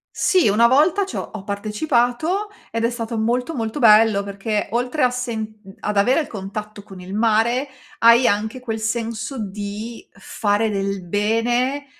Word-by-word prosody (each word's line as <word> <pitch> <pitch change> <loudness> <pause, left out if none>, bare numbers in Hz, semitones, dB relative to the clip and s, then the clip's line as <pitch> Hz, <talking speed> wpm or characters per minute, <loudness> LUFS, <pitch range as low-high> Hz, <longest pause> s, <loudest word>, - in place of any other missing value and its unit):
Sì. 370 - +3
Una 225 +4 +5
volta 320 +10 +3
c'ho 390 - -5
ho 215 -3 -7
partecipato, 245 - -1 0.2
ed 230 0 -3
è - - +2
stato 230 -1 -4
molto, 245 +7 -1
molto, 225 +4 -3
bello, 215 -3 +6
perché 200 +1 -3
oltre 250 +5 -1
a 250 - +5
sen 225 -4 -4
mhmm, 195 0 -13
ad 210 -1 -3
avere 250 +9 +4
il 300 - -6
contatto 210 +1 -7
con 195 -2 -12
il 185 +2 -7
mare, 230 +5 +2 0.3
hai 235 +2 +6
anche 220 +5 0
quel 225 -3 -4
senso 225 +3 -3
di 210 +2 -6
fare 205 +2 -1
del 195 -2 -2
bene 240 +8 0
225 Hz, 160 wpm, -21 LUFS, 205-245 Hz, 0.3 s, bello